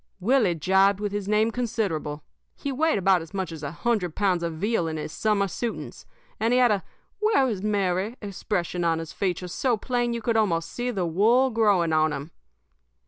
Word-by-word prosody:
"Willie 215 -3 +2
jibed 190 +4 +3
with 205 -1 -2
his 205 -1 -3
name 215 +2 +2
considerable. 195 -11 -2 0.3
He 280 - -4
weighed 315 0 +1
about 190 -2 +3
as 165 +4 -10
much 190 -3 -2
as 160 -2 -8
a 145 - -3
hundred 180 0 -1
pounds 190 -4 +1
of 170 -1 -2
veal 195 0 0
in 160 0 -3
his 155 - -5
summer 210 +2 +1
suitings, 230 +5 -5 0.3
and 225 +2 +1
he - - +4
had 245 -3 +5
a 200 -3 0 0.4
'Where 425 -11 +3
is 210 -6 -2
Mary?' 200 +2 0
expression 180 -3 -3
on 165 -1 +2
his 165 -1 -6
features 180 -2 -2
so 250 -4 +1
plain 240 +2 -1
that 235 - -2
you 235 - -4
could 230 0 +1
almost 165 -6 +1
see 245 +1 -3
the 195 -7 -1
wool 225 +10 +3
growing 200 -8 +2
on 155 -1 +3
him. 145 +4 -6
200 Hz, 200 wpm, -25 LUFS, 170-230 Hz, 0.4 s, had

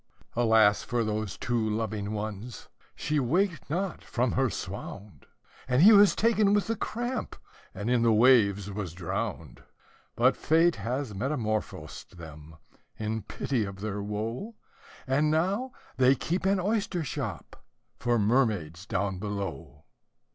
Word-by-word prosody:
Alas 110 -3 +4
for 120 -1 -1
those 110 -1 -3
two 115 -3 -1
loving 105 -1 -2
ones! 110 +2 -6 0.3
she 150 0 -1
waked 170 +7 0
not 180 +4 -2
from 120 -1 0
her 130 -1 +1
swound, 100 - -7 0.4
And 130 +4 +3
he 220 +3 +9
was 205 -1 +7
taken 215 -2 +3
with 205 - +1
the 225 - -1
cramp, 240 +4 -3 0.4
and 105 +3 -4
in 125 -1 +2
the 115 -1 +4
waves 105 -4 +4
was 95 -5 -5
drowned; 85 -1 -4 0.5
But - - +4
Fate 165 +2 +3
has 120 +3 -3
metamorphosed 110 - -3
them, 80 -1 -11 0.4
in 110 +1 -2
pity 120 +4 -2
of 100 -1 -7
their 105 -1 -3
woe, 110 - -4 0.5
And 140 +3 +2
now 195 +11 0 0.3
they 130 +1 +5
keep 175 +8 -2
an 195 0 +2
oyster 195 -3 -1
shop 125 - -6 0.4
for 120 -1 +1
mermaids 105 - +1
down 95 -2 -1
below. 100 -7 -5
115 Hz, 135 wpm, -28 LUFS, 100-155 Hz, 0.5 s, he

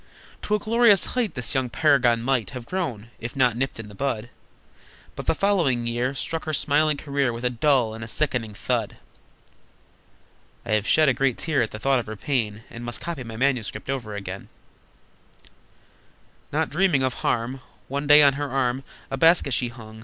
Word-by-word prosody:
To 210 - 0
a - - +2
glorious 220 -2 +4
height 245 -5 -1
The 125 -2 -1
young 130 -3 0
paragon 125 -3 +3
might 120 -6 0
Have 120 - -8
grown, 120 - -4
if 120 +1 -6
not 125 -4 +3
nipped 130 -1 -2
in 115 - -7
the 105 - -12
bud, 120 -1 -3 0.8
But - - -7
the - - +3
following 165 -13 +1
year 120 +3 -1
Struck 165 +4 -4
her 155 - -3
smiling 150 +1 +2
career 140 -3 0
With 115 +1 -6
a 125 - +2
dull 125 -2 +2
and 115 0 -7
a - - -6
sickening 115 -4 -2
thud! - - -2 1.7
(I - - -4
have 110 0 +1
shed 155 -1 +4
a 135 - +4
great 135 -1 0
tear 155 -5 0
at 115 - 0
the - - -7
thought 135 +3 +2
of 115 - -6
her 110 - -5
pain, 110 -3 -2
And 120 - -8
must 120 +1 -5
copy 165 -6 -5
my 115 -2 -8
manuscript 130 -1 -1
over 115 -6 -4
again!) 100 -1 -7 2.0
Not - - 0
dreaming 165 -4 +2
of 130 -1 +1
harm, 125 +3 -1 0.3
One 140 +2 -3
day 150 +1 +8
on 140 -1 +6
her 145 +1 -3
arm 130 0 0 0.3
A 135 - -2
basket 165 -2 +4
she 125 +1 0
hung. 110 -2 -11
130 Hz, 190 wpm, -24 LUFS, 115-145 Hz, 2.0 s, day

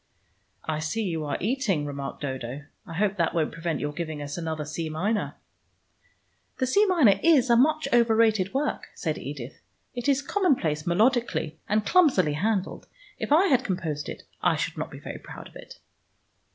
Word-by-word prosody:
"I 155 -1 -2
see 155 +9 -2
you 165 -5 -2
are 145 - -2
eating," 215 - 0
remarked 140 0 -6
Dodo. 130 0 -5 0.2
"I 165 - -7
hope 205 +2 +1
that 170 -1 +1
won't 160 -2 +1
prevent 165 -1 -3
your 145 0 -3
giving 155 -2 -4
us 145 0 -5
another 160 -3 -3
C 155 +2 -4
minor." 200 +8 -1 1.2
"The 260 - +1
C 405 +12 +3
minor 310 - +5
is 275 -7 +4
much 310 +6 +4
over 235 -2 +4
rated 220 -4 +3
work," 275 +3 -2
said - - -2
Edith; - - -7 0.3
"it 245 +2 -2
is 280 0 +2
commonplace 255 - +1
melodically, 215 -4 +1
and 210 +1 +1
clumsily 255 - +4
handled. 195 +4 -1 0.3
If - - -4
I 330 +6 +6
had 260 -8 +3
composed 160 -6 -3
it, - - -7 0.2
I - - +3
should - - -2
not - - -4
be - - -10
very - - -8
proud - - -10
of - - -20
it." - - -11
195 Hz, 175 wpm, -26 LUFS, 155-255 Hz, 1.2 s, I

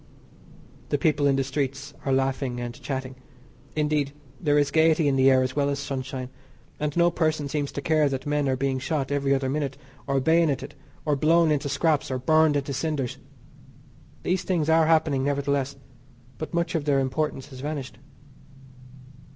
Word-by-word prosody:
The 145 - +1
people 145 -1 +2
in 140 - +3
the 135 - +1
streets 140 +1 -3
are 135 - 0
laughing 135 -1 0
and 120 -1 -4
chatting. 130 -2 -4 0.6
Indeed, 150 -2 0 0.3
there 150 -3 +2
is 145 -1 +2
gaiety 160 0 +4
in 140 - +2
the 135 0 +5
air 130 -1 +5
as 130 0 -3
well 140 -1 +1
as 140 - -1
sunshine, 130 -2 -4 0.5
and 150 +1 -2
no 175 0 +4
person 155 -3 0
seems 145 0 -2
to 140 - -4
care 155 -3 +3
that 135 +1 -4
men 145 -1 0
are 130 - +2
being 135 0 -1
shot 140 0 -2
every 140 -1 0
other 135 -1 -1
minute, 135 -1 -2 0.3
or 135 -1 +2
bayoneted, 160 -1 +2 0.3
or 150 -2 +2
blown 160 +3 +4
into 145 -1 0
scraps 155 0 +1
or 130 - -1
burned 155 +3 +3
into 140 0 -1
cinders. 140 -3 -2 1.0
These 185 +1 0
things 170 -5 0
are 160 0 +5
happening, 155 -4 +3
nevertheless, 140 -1 0 0.6
but 155 - -5
much 170 0 -1
of 160 -4 -1
their 140 -2 +3
importance 135 +1 -2
has 130 -2 -10
vanished. 140 -1 -5
145 Hz, 175 wpm, -25 LUFS, 135-155 Hz, 1.0 s, the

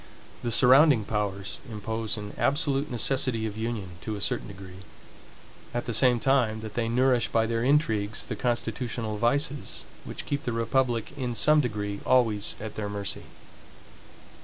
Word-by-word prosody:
The 120 - -2
surrounding 130 0 +6
powers 100 -2 -3
impose 110 +1 -3
an 105 -1 -7
absolute 140 0 +2
necessity 125 -2 +1
of 105 -2 -4
union 110 -4 -3
to 110 - -4
a - - -6
certain - - -2
degree, 95 -2 -11 1.0
at 120 - -1
the 120 - -3
same 125 +1 +4
time 115 -3 +2
that 110 -1 -7
they 115 -1 -1
nourish 125 0 +3
by 115 -1 +1
their 115 0 -1
intrigues 115 -7 +1
the - - -4
constitutional 115 -2 -2
vices 140 +6 0 0.2
which - - -6
keep 145 -1 -2
the 120 - -2
republic 115 0 0
in 125 -4 -3
some 150 +8 +5
degree 105 -5 -3
always 115 -5 +2
at 110 0 -6
their 105 -1 -4
mercy. 100 -1 -4
115 Hz, 155 wpm, -27 LUFS, 105-130 Hz, 1.0 s, surrounding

